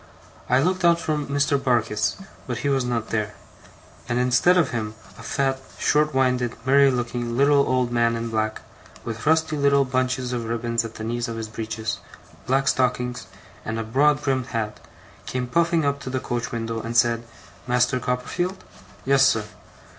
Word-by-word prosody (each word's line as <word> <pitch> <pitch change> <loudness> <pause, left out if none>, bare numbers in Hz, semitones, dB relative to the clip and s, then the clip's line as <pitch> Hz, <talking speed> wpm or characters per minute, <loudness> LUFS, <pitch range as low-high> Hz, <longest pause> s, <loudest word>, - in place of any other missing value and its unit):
I 125 - +4
looked 185 +5 0
out 170 -1 +5
for 155 -2 -1
Mr. 145 0 0
Barkis, 115 -5 +1 0.3
but 120 -2 -3
he - - +2
was 135 -2 +2
not 120 -2 -2
there; 105 -1 -1 0.7
and 120 - 0
instead 125 +9 +4
of 165 -6 +2
him 110 -2 -3 0.2
a 115 - -12
fat, 135 +3 -1 0.2
short 150 +1 +2
winded, 125 -2 +1
merry 140 +1 +6
looking, 120 -1 -2
little 140 +1 +5
old 130 -1 +1
man 115 -1 +2
in 115 0 -3
black, 110 0 -1 0.4
with 115 +3 -5
rusty 160 0 +3
little 140 -1 +3
bunches 130 -1 -1
of 120 -2 -2
ribbons 115 0 -1
at 115 -1 -8
the 110 - -6
knees 120 +2 -2
of 115 -1 -5
his 110 -1 -4
breeches, 110 0 -4 0.5
black 135 +1 +2
stockings, 125 -4 0 0.4
and 110 +1 -3
a 115 - -2
broad 145 +6 +3
brimmed 130 -3 0
hat, 110 -4 -3 0.5
came 125 -1 -2
puffing 165 +4 +2
up 140 0 0
to 140 - -6
the 130 0 -1
coach 120 -3 -3
window, 115 -1 -3
and 115 +1 -2
said: 115 -1 +3 0.5
'Master 125 +1 +2
Copperfield?' 175 +10 -2 0.4
'Yes, 135 0 +4
sir. 110 -4 +2
125 Hz, 175 wpm, -24 LUFS, 115-140 Hz, 0.7 s, merry